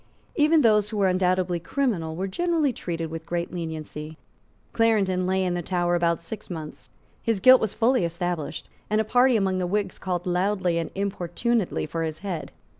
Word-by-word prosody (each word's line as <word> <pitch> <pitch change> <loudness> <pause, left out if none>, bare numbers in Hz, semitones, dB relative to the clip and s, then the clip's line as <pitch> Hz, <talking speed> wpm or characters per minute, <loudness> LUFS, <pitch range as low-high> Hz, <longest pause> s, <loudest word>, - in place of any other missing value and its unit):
Even 310 +1 +4
those 210 -4 +4
who 215 - -4
were 200 -2 +3
undoubtedly 185 -1 +1
criminal 180 - -1
were 185 +3 -2
generally 320 - +1
treated 165 -5 -4
with 165 0 -5
great 170 +1 -3
lenity. 155 -2 -6 0.6
Clarendon 195 -5 +2
lay 190 0 +1
in 180 -1 0
the 175 - -1
Tower 175 0 0
about 170 -1 +1
six 215 +3 -8
months. 160 -4 -8 0.3
His 225 -4 0
guilt 255 +6 +7
was 220 - -1
fully 240 -2 +3
established; 170 -2 -3 0.2
and 215 +1 +2
a - - +3
party 245 +3 +4
among 190 -2 0
the 180 - -1
Whigs 200 0 -2
called 180 -2 -3
loudly 180 -1 +1
and 165 - -3
importunately 200 +3 -1
for 165 +2 -4
his 160 -1 -2
head. 175 -5 -4
185 Hz, 180 wpm, -25 LUFS, 170-215 Hz, 0.6 s, guilt